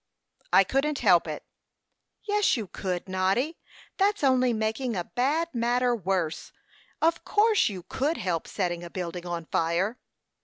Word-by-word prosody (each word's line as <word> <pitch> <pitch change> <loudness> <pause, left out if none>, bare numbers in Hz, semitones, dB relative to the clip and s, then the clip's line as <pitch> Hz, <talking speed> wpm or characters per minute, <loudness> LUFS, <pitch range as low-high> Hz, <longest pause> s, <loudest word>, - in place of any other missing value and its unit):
"I 195 - +7
couldn't 275 +8 0
help 180 -9 +4
it." 155 -1 -5 0.8
"Yes, 415 -7 +2
you 220 - -3
could, 180 -1 -4
Noddy. 190 - 0 0.4
That's 405 -2 +1
only 255 -2 +4
making 220 +2 -1
a 175 - -1
bad 295 - 0
matter 245 +1 +1
worse. 185 -6 -2 0.5
Of 330 +1 +2
course 425 - +3
you 185 -4 -7
could 285 - -1
help 170 -3 -2
setting 175 -3 -2
a 175 - -7
building 175 0 -5
on 170 -1 -4
fire." 175 +9 0
220 Hz, 145 wpm, -27 LUFS, 180-270 Hz, 0.8 s, I